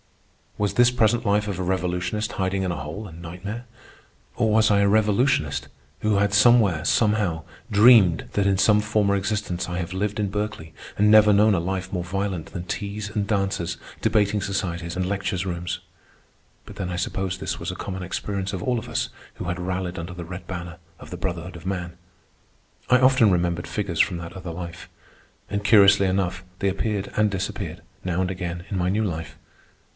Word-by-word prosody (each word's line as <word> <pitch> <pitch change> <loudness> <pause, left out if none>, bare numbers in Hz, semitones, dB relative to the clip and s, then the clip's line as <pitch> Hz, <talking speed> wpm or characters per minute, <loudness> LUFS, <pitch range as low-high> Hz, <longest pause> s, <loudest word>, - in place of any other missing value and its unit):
Was 105 -1 0
this 120 0 +5
present 120 -1 +2
life 105 0 +2
of 95 -3 -3
a - - -1
revolutionist, 90 +4 -1
hiding 95 0 -1
in 90 - -1
a - - -2
hole, 80 +8 -6
a - - -11
nightmare? 90 +8 -7 0.7
or 115 -2 +1
was 110 0 +4
I 100 - +4
a 100 - +4
revolutionist 105 - +2 0.3
who 105 -1 +2
had 100 0 +2
somewhere, 105 -7 +5
somehow, 105 -7 +2 0.3
dreamed 105 -5 +6
that 100 -1 +2
in 100 -1 +3
some 105 +2 +4
former 105 -1 +1
existence 100 -3 -2
I 90 - -3
have 85 0 -4
lived 105 +3 -2
in 105 -2 0
Berkeley 100 -6 -4 0.2
and 105 +1 +4
never 105 -1 +7
known 105 +1 +5
of 85 - -1
life 95 +1 -3
more 90 -2 -1
violent 95 -2 -3
than 85 - -6
teas 100 +2 -4
and 105 -2 -1
dances, 95 -5 -1 0.2
debating 105 -1 +2
societies, 85 -4 -3
and 95 0 -1
lecture 100 0 -2
rooms? 85 -1 -3 0.9
But - - -11
then 95 -3 -3
I 90 - -3
suppose 90 +1 -2
this - - -4
was - - -3
a - - -7
common 95 -1 -5
experience 100 +2 -3
of 95 - -4
all 125 -2 +1
of - - -10
us - - -1 0.3
who - - -6
had 90 +1 -3
rallied 90 0 -3
under 85 +2 -6
the 90 -1 -7
red 90 +1 -8
banner 85 -2 -6 0.2
of - - -12
the 90 - -5
brotherhood 90 -1 -4
of 85 0 -11
man. 90 -2 -3 0.9
I 125 - +6
often 130 -4 +5
remembered 85 -1 0
figures 100 -6 -3
from 90 -3 +3
that 85 0 -8
other 90 -2 -7
life, 85 0 -8 0.6
and, 100 0 -2
curiously 100 -2 +6
enough, 95 -1 -1
they 100 - +1
appeared 100 +1 -2
and 105 0 +3
disappeared, 95 -1 -4 0.2
now 90 -1 -1
and 95 0 -1
again, 90 -1 -5
in 100 - -2
my 90 +1 +1
new 105 +3 +1
life. 80 -5 -4
95 Hz, 190 wpm, -24 LUFS, 90-105 Hz, 0.9 s, never